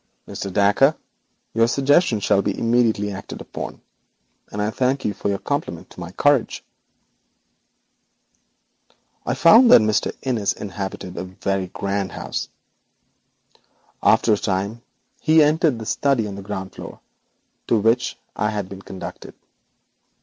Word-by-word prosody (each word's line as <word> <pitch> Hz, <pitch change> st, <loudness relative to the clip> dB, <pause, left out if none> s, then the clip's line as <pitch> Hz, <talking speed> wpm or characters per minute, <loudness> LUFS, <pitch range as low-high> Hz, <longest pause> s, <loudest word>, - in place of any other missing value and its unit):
'Mr. 100 Hz, -, -5 dB
Dacre, 105 Hz, -, +4 dB, 0.6 s
your 115 Hz, 0 st, +3 dB
suggestion 140 Hz, -1 st, +3 dB
shall 100 Hz, 0 st, +2 dB
be 100 Hz, 0 st, -2 dB
immediately 115 Hz, -3 st, +1 dB
acted 100 Hz, 0 st, -8 dB
upon, -, -, -7 dB, 0.7 s
and 105 Hz, -, -5 dB
I 105 Hz, +1 st, 0 dB
thank 130 Hz, +3 st, 0 dB
you 105 Hz, -, 0 dB
for 100 Hz, -, -3 dB
your 100 Hz, -, 0 dB
compliment 140 Hz, -, -4 dB
to -, -, -13 dB
my 85 Hz, -1 st, -6 dB
courage.' 145 Hz, +3 st, +1 dB, 2.6 s
I -, -, 0 dB
found 230 Hz, +9 st, +7 dB
that -, -, +9 dB
Mr. 110 Hz, -1 st, +1 dB
Innis 110 Hz, -7 st, 0 dB
inhabited 95 Hz, -2 st, -6 dB
a 85 Hz, -, -3 dB
very 95 Hz, 0 st, -2 dB
grand 100 Hz, +1 st, -3 dB
house. -, -, -4 dB, 1.5 s
After 110 Hz, -, +4 dB
a -, -, +2 dB
time 100 Hz, +4 st, -2 dB, 0.4 s
he 155 Hz, 0 st, +5 dB
entered 150 Hz, -3 st, +2 dB
the 110 Hz, -, -7 dB
study 125 Hz, 0 st, +1 dB
on 100 Hz, -, -5 dB
the 100 Hz, -, -7 dB
ground 95 Hz, -1 st, -6 dB
floor, -, -, -10 dB, 0.7 s
to 115 Hz, -, +3 dB
which 115 Hz, +3 st, +1 dB, 0.2 s
I 105 Hz, -, 0 dB
had 105 Hz, -3 st, -4 dB
been 95 Hz, 0 st, -9 dB
conducted. 95 Hz, -1 st, -9 dB
105 Hz, 135 wpm, -22 LUFS, 100-125 Hz, 2.6 s, that